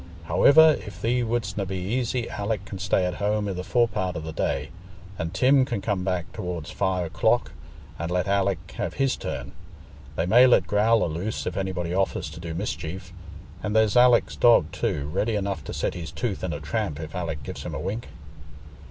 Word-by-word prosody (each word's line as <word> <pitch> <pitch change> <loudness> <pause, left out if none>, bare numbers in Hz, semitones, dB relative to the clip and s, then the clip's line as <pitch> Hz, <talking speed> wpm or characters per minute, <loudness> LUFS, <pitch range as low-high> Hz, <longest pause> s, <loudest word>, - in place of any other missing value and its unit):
Howiver, 155 - +6
if 100 - -9
thee 125 +2 +1
wouldstna 110 -5 -2
be 95 0 -3
easy, 120 +5 -1
Alick 100 -1 -3
can 95 -1 -7
stay 95 -1 +1
at 90 0 -3
home 105 0 +1
i' 100 - -2
the 90 0 -4
forepart 105 -6 0
o' - - -2
the 80 0 -6
day, - - -2 0.5
and 80 0 -2
Tim 130 +8 +4
can 120 -4 -2
come 100 -2 -1
back 90 -3 -2
tow'rds 85 -3 -5
five 95 -2 0
o'clock, 80 - +1 0.5
and 85 +1 -3
let 90 +1 0
Alick 100 -1 0
have - - -3
his 135 -1 +1
turn. - - -5 0.6
They 80 - 0
may 120 +7 +7
let 125 - +4
Growler 110 0 +3
loose 85 +7 -3
if - - -3
anybody 90 -3 -2
offers 95 +1 -1
to - - -9
do 85 -1 -6
mischief, 90 -1 -5 0.5
and 105 0 -2
there's 110 -1 +3
Alick's 125 -1 +5
dog 100 -10 +5
too, 70 -2 -2
ready 105 +8 -1
enough 100 -1 -2
to - - -6
set - - -1
his 85 -2 -6
tooth 110 -7 -3
in 90 - -1
a 75 - -4
tramp 75 +1 -3
if 80 -1 -7
Alick 80 -5 -4
gives - - -7
him - - -5
a - - -3
wink." 110 +5 -4
95 Hz, 195 wpm, -25 LUFS, 90-110 Hz, 0.6 s, may